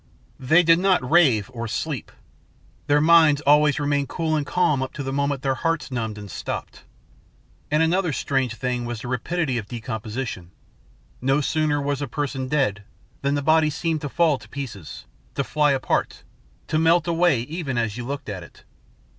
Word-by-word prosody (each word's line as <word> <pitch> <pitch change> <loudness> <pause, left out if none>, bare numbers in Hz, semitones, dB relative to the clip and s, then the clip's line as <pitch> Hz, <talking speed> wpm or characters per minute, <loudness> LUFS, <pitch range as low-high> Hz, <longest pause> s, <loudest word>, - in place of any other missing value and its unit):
They 160 +7 +4
did 165 0 +5
not 185 -8 +2
rave 130 -9 +4
or 115 -1 -4
sleep. 140 +4 -4 0.8
Their 145 0 +4
minds 160 -2 +6
always 150 0 +4
remained 145 -1 0
cool 160 -2 -1
and 145 -2 -1
calm 170 -7 +1
up 130 - -4
to 140 - -5
the 135 0 -4
moment 140 -1 -1
their 135 -1 +1
heart 165 0 -2
numbed 110 -4 -3
and 100 -2 -9
stopped. - - -6 0.8
And 150 +2 +3
another 175 +1 +1
strange 135 -4 -1
thing 125 -1 -2
was 120 -2 -5
the - - -7
rapidity 130 +2 -1
of 105 - -8
decomposition. 110 -4 -5 0.7
No 135 +3 +2
sooner 150 0 0
was 145 0 -2
a 145 - -2
person 135 -3 -3
dead 130 -8 0 0.4
than 140 +1 0
the 145 - -2
body 155 +1 +4
seemed 155 +1 -2
to 145 - -4
fall 160 -2 +2
to 110 -1 -15
pieces, 115 - -7 0.3
to 140 - 0
fly 150 +1 +2
apart, 135 -1 -1 0.4
to 155 - 0
melt 165 +1 +3
away 170 -6 +2
even 145 -1 -4
as 115 -3 -1
you 120 - -5
looked 140 +3 -5
at 100 -4 -5
it. 85 - -15
140 Hz, 180 wpm, -23 LUFS, 125-155 Hz, 0.8 s, minds